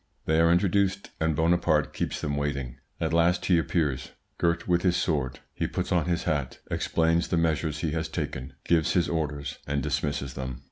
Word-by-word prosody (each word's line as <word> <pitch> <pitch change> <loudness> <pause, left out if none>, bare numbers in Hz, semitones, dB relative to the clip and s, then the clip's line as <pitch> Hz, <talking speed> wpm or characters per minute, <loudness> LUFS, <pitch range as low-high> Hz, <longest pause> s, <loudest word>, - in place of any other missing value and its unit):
They 80 +1 +3
are 85 0 +5
introduced, 95 +2 +2
and 80 -1 +1
Bonaparte 80 -2 +2
keeps - - -2
them 70 -1 -1
waiting. 70 -4 -2 0.2
At 80 0 -1
last 85 +2 +3
he 90 -3 +4
appears, 75 -5 -1 0.3
girt 85 -1 +1
with 90 -1 +3
his 90 -1 +2
sword; 70 -7 -1
he - - -1
puts - - -3
on 85 -3 +2
his 85 -1 0
hat, 70 -4 -1
explains 85 +1 +1
the 85 - 0
measures 80 -2 0
he 80 - 0
has 80 +1 -1
taken, 65 -3 -4
gives 80 -1 +3
his 85 -3 +3
orders, 75 -4 -3
and 70 -1 -1
dismisses 70 -2 -1
them. 65 -3 -5
80 Hz, 185 wpm, -27 LUFS, 70-85 Hz, 0.3 s, are